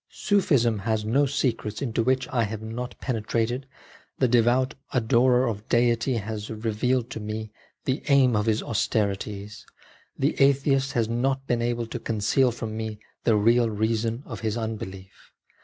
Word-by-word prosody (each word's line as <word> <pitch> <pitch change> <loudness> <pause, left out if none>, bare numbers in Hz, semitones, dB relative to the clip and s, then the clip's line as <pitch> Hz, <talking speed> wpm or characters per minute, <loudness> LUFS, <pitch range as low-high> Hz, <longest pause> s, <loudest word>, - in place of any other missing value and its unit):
Sufism 135 - +2
has 110 +1 -1
no 135 +6 +3
secrets 120 -6 -1
into 120 -4 -1
which 130 +2 +1
I 120 -3 +2
have 110 +1 -6
not 120 +3 -6
penetrated; 120 +1 -1 0.5
the 130 - +3
devout 125 +2 +3 0.2
adorer 125 +1 +3
of 110 -1 -5
Deity 120 +1 +2
has" 110 -1 -4
vealed 115 +3 -1
to - - -5
me 110 0 -5 0.3
the 130 0 0
aim 135 -4 +5
of 105 +1 0
his 110 -1 +1
austerities; 105 -2 -2 0.5
the - - +1
atheist 135 -1 +3
has 115 -2 +1
not 135 +3 0
been 120 -3 0
able 120 0 -1
to 115 +2 -6
conceal 115 +4 +2
from 115 -2 -5
me 110 -1 -4 0.3
the 115 - +4
real 115 +3 +4
reason 110 +3 -1
of - - -7
his 110 0 -2
unbelief 110 -4 -6
115 Hz, 155 wpm, -25 LUFS, 110-125 Hz, 0.5 s, aim